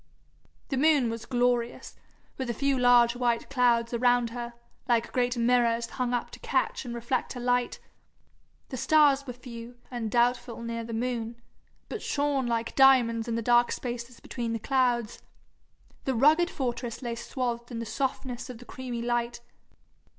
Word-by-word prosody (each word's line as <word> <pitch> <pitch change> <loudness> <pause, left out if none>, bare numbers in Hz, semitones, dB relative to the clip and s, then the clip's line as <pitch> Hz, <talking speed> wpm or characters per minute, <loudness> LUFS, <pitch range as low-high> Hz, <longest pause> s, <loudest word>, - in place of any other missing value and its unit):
The 270 - -1
moon 280 -4 +4
was 230 0 -6
glorious, 245 -1 0 0.4
with 260 -2 -4
a 235 - -1
few 275 +3 +1
large 245 -1 +5
white 240 0 0
clouds 240 -3 +2
around 245 0 +2
her, 235 0 -6 0.3
like 235 -1 +1
great 245 0 0
mirrors 235 -1 +2
hung 245 +1 -3
up 245 -1 -2
to - - -11
catch - - -1
and 240 -1 -5
reflect 240 +2 -2
her 250 - -7
light. 245 0 0 0.9
The 260 - -5
stars 285 0 +4
were 250 - -4
few, 240 -1 -10
and 235 -3 -3
doubtful 240 0 +1
near 230 0 -4
the 230 - -7
moon, 235 -1 -3 0.5
but - - -5
shone 285 -3 0
like 230 -1 -2
diamonds 245 -4 +5
in 230 - -1
the 230 - -2
dark 240 +1 +4
spaces 240 0 -5
between 235 -2 -4
the - - 0
clouds. 240 -2 0 0.8
The 265 - 0
rugged 310 +8 +4
fortress 245 -4 -4
lay 240 -1 -2
swathed 240 0 -3
in 240 - -6
the 230 - -4
softness 255 0 -3
of 250 - -7
the 245 - -13
creamy 245 -1 -5
light. 240 0 -1
245 Hz, 165 wpm, -28 LUFS, 235-255 Hz, 0.9 s, large